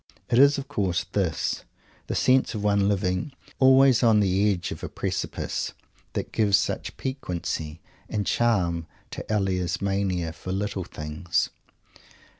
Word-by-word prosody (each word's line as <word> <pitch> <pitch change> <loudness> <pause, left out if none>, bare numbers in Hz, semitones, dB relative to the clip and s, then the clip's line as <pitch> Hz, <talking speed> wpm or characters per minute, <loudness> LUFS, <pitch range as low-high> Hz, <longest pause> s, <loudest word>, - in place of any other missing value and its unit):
It 120 - +4
is, 140 +1 +6
of 140 0 -5
course, 100 -10 0
this, 90 -6 -1 0.4
the - - -2
sense 130 -2 +3
of 105 - -3
one 100 -1 +3
living 95 +7 -1 0.3
always 130 -1 +6
on 115 -3 +5
the 100 +1 +3
edge 90 -3 -3
of - - -6
a - - -3
precipice, - - -3 0.4
that - - -3
gives 100 -3 +3
such - - -3
piquancy 85 - -4 0.3
and 105 -2 -1
charm 90 -9 +1 0.2
to - - -5
Elia's 90 -4 0
mania 95 -4 -1
for 95 - -7
"little 100 -1 -2
things." 75 +2 -2
100 Hz, 140 wpm, -26 LUFS, 90-110 Hz, 0.4 s, is